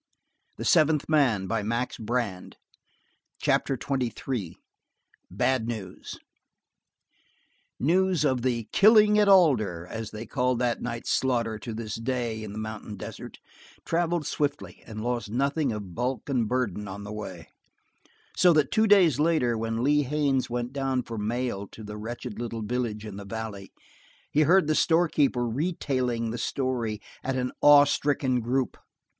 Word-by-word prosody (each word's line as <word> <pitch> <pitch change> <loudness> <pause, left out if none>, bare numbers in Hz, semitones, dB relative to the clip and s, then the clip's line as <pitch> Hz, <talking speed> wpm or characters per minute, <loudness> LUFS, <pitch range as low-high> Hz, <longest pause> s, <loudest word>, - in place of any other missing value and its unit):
The - - -5
fifth 155 -3 +3
man 140 -10 +3
had 110 -1 -2
died 120 +2 -1
for - - -9
Grey 120 -1 0
Molly. 90 - -13 0.9
Chapter 135 - +1
XXIII. 125 -7 -3 0.7
Bad 130 -4 0
News 105 -6 -6 1.6
News 180 +2 +2
of 130 -3 +1
the 120 -2 0
Killing 210 0 +6
at 205 -1 +4
Alder, 120 - +4
as 110 +3 -6
they 110 +2 -7
call 125 +2 0
that 120 0 -1
night's 120 -1 -4
slaughter 115 -4 0
to 110 +2 -6
this 110 -1 -5
day 115 -2 -2
in 105 - -7
the 105 - -8
mountain 110 -1 -6
desert, - - -8 0.5
traveled 170 -1 0
swiftly, 145 0 -3
and 110 -1 -6
lost 120 -3 -2
nothing 140 +4 0
of 100 -5 -6
bulk 125 +6 -2
and 125 -5 +1
burden 110 -5 -1
on 100 +1 -7
the 105 +1 -7
way; 95 -6 -7 0.9
so 180 -2 +5
that 150 -4 +2
two 220 0 +3
days 180 - +5
later, 150 -7 +2
when 115 +1 -2
Lee 145 +2 +4
Haines 140 -1 0
went 120 +1 -3
down 135 -2 -1
for 115 -2 -6
mail 110 -2 -2
to 110 - -12
the 105 0 -7
wretched 115 0 -6
little 115 -2 -4
village 110 -2 -3
in 105 -2 -7
the 100 - -7
valley, 100 -2 -6 0.6
he 150 - +3
heard 175 +4 +5
the 155 - +1
store 170 +2 +3
keeper 135 -6 +1
retailing 125 -4 -1
the 120 - -4
story 120 -5 -2 0.3
to 130 0 -1
an 125 0 -2
awe 145 -1 +8
stricken 140 -3 0
group. 125 +3 -1
125 Hz, 155 wpm, -27 LUFS, 110-145 Hz, 1.6 s, awe